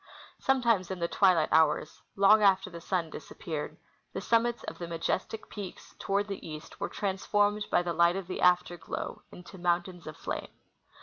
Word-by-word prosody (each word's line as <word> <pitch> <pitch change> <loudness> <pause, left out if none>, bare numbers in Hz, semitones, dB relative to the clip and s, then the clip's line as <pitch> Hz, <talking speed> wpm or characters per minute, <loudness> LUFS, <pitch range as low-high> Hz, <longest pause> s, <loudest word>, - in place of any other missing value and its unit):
Some 265 -1 +2
times 210 -7 +2
in 190 - -3
the 170 -1 -1
twilight 180 -4 +3
hours, 155 -1 +2
long 200 +2 +6
after 195 -1 +4
the 170 -1 -8
sun 170 -2 -1
disappeared, 155 -3 -6 0.4
the - - -3
summits 235 +1 +1
of - - -7
the 170 - -4
majestic 170 +6 -2
peaks 200 -4 -8
toward 200 +1 0
the 200 -2 -6
east 155 -1 -9
were - - -2
transformed 205 +1 0
by - - +3
the 175 -1 -2
light 170 +1 +4
of 195 -1 -3
the 185 - -5
after 180 -1 +3
glow - - -5
into 180 +1 -12
mountains 175 0 -1
of 155 - -7
flame. - - -4
185 Hz, 180 wpm, -30 LUFS, 170-205 Hz, 0.4 s, long